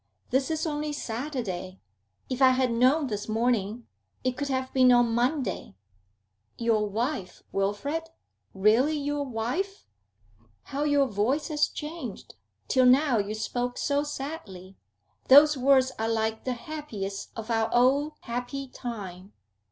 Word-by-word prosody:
This 265 +3 +1
is 315 0 -1
only 300 -1 -2
Saturday. 225 -9 -4 0.5
If 255 +1 -4
I 260 -1 +7
had 255 -2 +2
known 260 +6 +3
this 210 -4 -4
morning, 225 0 0 0.4
it 255 -1 0
could 285 +2 -3
have 260 -1 -2
been 255 -1 +6
on 240 -1 +4
Monday.' 245 - -1 0.8
'Your 220 -3 +1
wife, 225 -2 -3
Wilfrid? 205 +12 -1 0.5
Really 230 +10 +3
your 290 0 -2
wife?' 270 - -3 0.8
'How 285 +2 -3
your 290 -2 +3
voice 255 - 0
has 300 -1 +2
changed! 300 - -7 0.3
Till 255 -1 +4
now 260 -2 +4
you 205 +1 -2
spoke 245 +3 -3
so 285 0 +1
sadly. 270 - -7 0.5
Those 295 +3 +8
words 265 0 +4
are 225 0 0
like 220 0 -1
the 255 - 0
happiest 235 -8 -6
of 225 +1 -5
our 225 0 +1
old 275 +5 +3
happy 250 +3 -5
time. 200 -7 -7
250 Hz, 135 wpm, -27 LUFS, 220-285 Hz, 0.8 s, Those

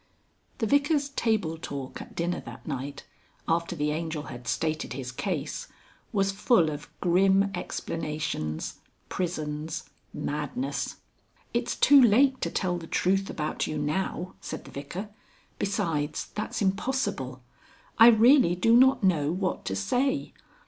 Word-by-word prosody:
The 225 - 0
Vicar's 285 +3 +2
table 215 - 0
talk 140 -4 -6
at - - -11
dinner 175 +1 -1
that - - -10
night, 140 -1 -5 0.4
after 170 +1 0
the 150 -1 0
Angel 160 -1 -3
had 125 -4 -9
stated 155 +1 -1
his 130 -1 -5
case, 155 +1 -3 0.4
was 195 -2 +2
full 195 -5 +3
of 145 0 -7
grim 195 +3 +4
explanations, 150 - -3 0.3
prisons, 160 -1 -3 0.2
madness. 150 - -3 0.6
"It's - - 0
too 285 -1 +7
late 260 +3 +5
to - - 0
tell 175 -2 -1
the 165 - -9
truth 195 +3 +1
about 150 -1 -2
you 155 - -3
now," 170 +4 -2
said - - -6
the - - -11
Vicar. 175 +9 -6 0.5
"Besides, 155 -7 -1
that's 215 0 -3
impossible. 195 - -1 0.6
I 225 - +10
really 235 -4 +6
do 225 +6 +4
not 260 -1 +5
know 155 -6 +3
what 185 +1 -2
to 95 - -2
say. 265 - 0
175 Hz, 135 wpm, -27 LUFS, 150-215 Hz, 0.6 s, I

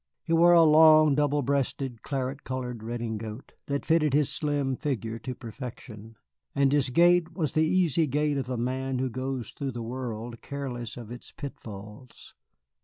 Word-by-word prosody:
He 165 - -2
wore 170 +1 +6
a 170 -1 +7
long, 155 -1 +7
double 145 0 +1
breasted, 135 -2 -1
claret 135 0 -3
colored 125 -3 -4
redingote 110 0 -5 0.2
that 140 0 -2
fitted 155 -4 +3
his 150 -2 +3
slim 145 -3 -1
figure 115 -5 -3
to 125 +3 -6
perfection, 115 -2 -9 0.4
and 140 -1 +3
his 140 -2 +2
gait 175 +4 +4
was 155 -7 -1
the 155 0 +3
easy 170 -3 +2
gait 145 +1 0
of 130 -1 -5
a 125 - -2
man 130 +2 -2
who 130 0 -1
goes 130 -1 -4
through 135 -3 -4
the 120 -1 -5
world 115 -1 -5
careless 125 -5 -5
of 115 -2 -9
its 120 - -9
pitfalls. 105 -3 -10
130 Hz, 165 wpm, -27 LUFS, 120-150 Hz, 0.4 s, a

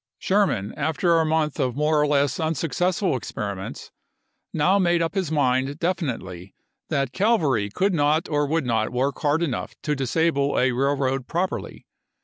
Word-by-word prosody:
Sherman, 185 - 0
after 160 +3 +1
a 160 - +2
month 155 -2 0
of 125 -2 0
more 150 +1 +2
or 150 - +2
less 145 0 +1
unsuc 160 -1 -1
cessful 180 0 +1
experiments, 100 -5 -6 0.6
now 180 +6 +2
made 175 -2 +2
up 165 -1 -1
his 190 -6 -2
mind 135 -1 +1
defi 175 +1 -1
nitely 95 -6 -6 0.4
that 135 -2 -1
cavalry 145 - +2
could 190 - 0
not 155 +1 +2
or 145 -2 0
would 160 -1 0
not 110 -3 0
work 130 +3 -1
hard 150 +2 +1
enough 140 -8 -3
to 150 - 0
disable 140 +1 0
a 125 0 +3
railroad 135 0 0
properly. 180 +3 -3
145 Hz, 160 wpm, -24 LUFS, 130-165 Hz, 0.6 s, a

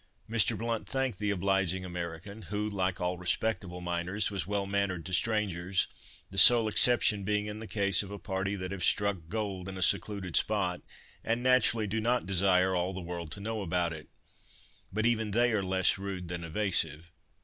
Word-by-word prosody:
Mr. 115 -2 +2
Blount 115 -1 -3
thanked 135 -6 -1
the 105 - -1
obliging 95 -1 0
American, 90 +4 -6
who, 105 +1 -2
like 95 -3 -1
all 90 0 -2
respectable 90 0 -1
miners, 90 +4 -1
was 95 -3 -3
well 100 -1 -1
mannered 100 -4 -1
to 90 - -6
strangers, 95 -2 -1
the 95 - 0
sole 115 +1 +8
exception 110 -2 +3
being 105 +1 0
in 105 0 -6
the 110 - -8
case 100 -3 +2
of 100 - -8
a 100 - -6
party 100 +1 -2
that 95 -1 -5
have 95 -2 -4
"struck 100 0 +3
gold" 100 -3 -3
in 95 - -7
a 95 - +1
secluded 95 -1 +1
spot, 95 -4 +2 0.4
and 115 +2 -1
naturally 125 -3 +4
do 110 +2 -2
not 120 +2 +1
desire 95 -1 +3
all 90 +1 -1
the - - -4
world 85 -2 -6
to 95 - -6
know 110 +1 -3
about 85 -2 0
it. 75 -1 -10 0.8
But 110 +3 -1
even 110 -2 +1
they 120 +4 +2
are 105 - +1
less 95 0 +1
rude 95 -3 -5
than 85 -1 -4
evasive. 85 -2 -1
95 Hz, 185 wpm, -30 LUFS, 90-105 Hz, 0.8 s, sole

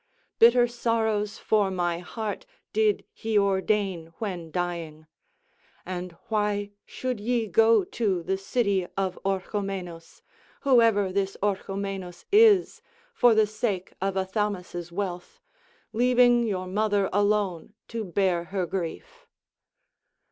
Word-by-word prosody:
Bitter 240 +1 +7
sorrows 220 -3 -1
for 210 -3 +1
my 175 -2 -1
heart 210 +3 -5 0.3
did 215 -1 +2
he 220 -1 -1
ordain 195 -3 +1
when 180 -7 -5
dying. 165 -2 -4 0.8
And 180 -1 -5
why 210 -2 -1 0.2
should 255 -3 -4
ye 235 +2 0
go 220 +1 +4
to 190 -3 -1
the 190 - 0
city 195 -3 0
of 190 -2 -1
Orchomenus, 190 -3 -4 0.4
whoever 230 -8 +4
this 195 0 -1
Orchomenus 195 -2 -3
is, 415 -3 +5 0.3
for 245 - +5
the 220 0 +5
sake 210 -3 -3
of 195 0 -1
Athamas' 190 -3 -2
wealth, 180 - -5 0.5
leaving 245 0 +4
your 185 -3 -2
mother 205 +1 +1
alone 205 -2 0
to 230 -1 -3
bear 180 -2 0
her 185 +1 -2
grief?" 190 - -6
200 Hz, 110 wpm, -26 LUFS, 185-220 Hz, 0.8 s, Bitter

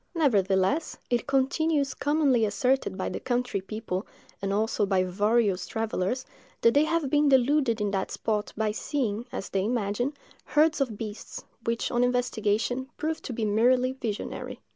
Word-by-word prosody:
Nevertheless, 205 - +2
it 240 -2 +1
continues 280 +2 +1
commonly 285 -5 +2
asserted 250 0 +1
by 190 - -2
the - - -4
country 245 -5 -1
people, 205 -1 -4 0.3
and 195 0 -1
also 215 +1 +1
by 190 -2 +2
various 205 +1 +1
travellers, 225 +2 -2 0.4
that 230 - +5
they 290 +2 +4
have 320 -4 0
been 295 -1 +4
deluded 265 -2 +3
in 205 -1 0
that 190 -1 -1
spot 210 -1 -2
by 215 -1 +1
seeing, 230 -1 -2
as - - -5
they 190 -1 0
imagine, 235 +4 -1 0.3
herds 305 0 +3
of 235 -6 -1
beasts, 215 -1 -7 0.2
which, 230 0 -1
on 240 0 +2
investigation, 245 0 0
prove 315 +1 -2
to - - -6
be 225 -2 -2
merely 250 +5 +3
visionary. 230 -6 -5
235 Hz, 155 wpm, -27 LUFS, 210-270 Hz, 0.4 s, that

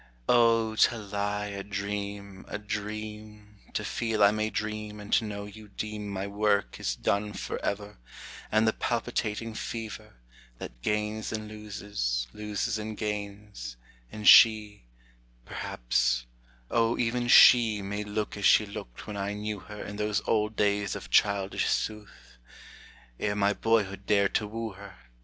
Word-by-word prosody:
O, 115 -2 +4
to 120 - +4
lie 105 0 -2
a 100 -1 -5
dream, 100 -1 -5
a - - -4
dream, 105 0 -6 0.2
To - - -1
feel 110 -2 0
I 100 - +7
may 110 0 -1
dream 105 -1 -4
and 105 0 -6
to - - +4
know 100 -1 -5
you 105 +1 -11
deem 105 0 -5
My 95 0 -3
work 100 0 0
is - - -1
done 105 +8 -1
forever, 100 -1 -4 0.5
And 110 +1 +3
the 110 - +3
palpitating 115 -2 -2
fever, 110 - -6 0.4
That - - -9
gains 105 - -1
and 110 -1 -4
loses, 105 - -3
loses 105 +1 -2
and 110 0 -5
gains, 100 - -5 0.3
And 105 -1 -4
she, 105 - +7 0.6
Perhaps, - - 0 0.5
O 115 0 +2
even 120 +1 0
she 115 -4 +7
May 105 +2 -3
look 105 +1 -3
as 100 - -2
she 110 - +6
looked 60 -12 -9
when 105 - -6
I 100 +1 -2
knew 105 0 -4
her 105 +4 -9
In 105 - -7
those 105 0 0
old 105 0 +1
days 100 -1 +1
of - - -8
childish 100 -1 +2
sooth, 105 - -4 0.8
Ere 105 0 0
my 100 0 +2
boyhood 100 -3 0
dared 100 -2 +3
to 105 - 0
woo 115 +1 -4
her. 100 0 -12
105 Hz, 145 wpm, -28 LUFS, 100-110 Hz, 0.8 s, I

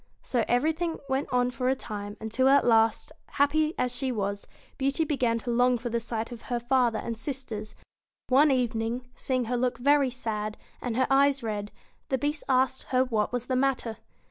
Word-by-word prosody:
So 240 -3 0
everything 320 +7 +1
went 270 +1 -1
on 250 0 +2
for 250 0 -1
a 265 - +2
time, 205 -4 -6
until 225 +4 +1
at 280 +1 +5
last, 225 +3 +3 0.2
happy 305 +3 +2
as 250 -1 -1
she 260 +1 -1
was, 200 -3 -3 0.3
Beauty 275 +4 +1
began 255 -6 +1
to 240 +1 -4
long 245 +1 +3
for 240 +1 -4
the 235 - +1
sight 230 0 -4
of 235 -1 -8
her 240 -1 0
father 240 -2 +2
and 230 +1 -4
sisters; 225 -4 -5 0.5
and 255 - +1
one 295 +3 +6
evening, 230 -3 0
94 250 - -27
seeing 255 -2 0
her 245 +2 -1
look 245 0 0
very 280 +2 +3
sad, 215 -4 -4 0.2
and 245 -2 -3
her 260 - +3
eyes 275 -1 +4
red, 210 -2 -3 0.4
the 265 - +1
Bt. - - -13
Beast 295 0 -5
asked 260 0 +2
her 255 0 +2
what 220 -4 0
was 245 -1 -2
the 255 - -1
matter. 255 -4 0
250 Hz, 200 wpm, -27 LUFS, 230-265 Hz, 0.5 s, one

